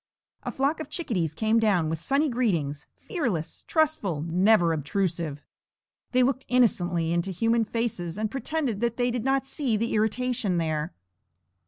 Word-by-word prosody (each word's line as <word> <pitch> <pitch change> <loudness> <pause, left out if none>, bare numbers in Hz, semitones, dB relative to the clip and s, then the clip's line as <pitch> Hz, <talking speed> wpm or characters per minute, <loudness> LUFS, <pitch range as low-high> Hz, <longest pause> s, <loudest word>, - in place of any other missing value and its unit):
A - - -4
flock 280 +4 0
of 315 - -6
chickadees 180 - -2
came 220 +5 +2
down 200 -7 +2
with 160 0 -3
sunny 280 - +2
greetings, 170 - -1
fearless, 235 - -3
trustful, 290 - +1
never 175 +1 +3
obtrusive. 160 -1 -2 0.7
They 255 0 +4
looked 265 +1 +1
innocently 175 -9 +2
into 170 +2 0
human 225 +5 +1
faces 205 -7 -3
and 215 0 -2
pretended 270 -4 -2
that 235 -1 0
they 245 0 +1
did 240 -2 -2
not 270 +1 +1
see 270 -5 -1
the 230 +2 -1
irritation 220 -2 0
there. 155 -2 -1
220 Hz, 150 wpm, -26 LUFS, 170-250 Hz, 0.7 s, They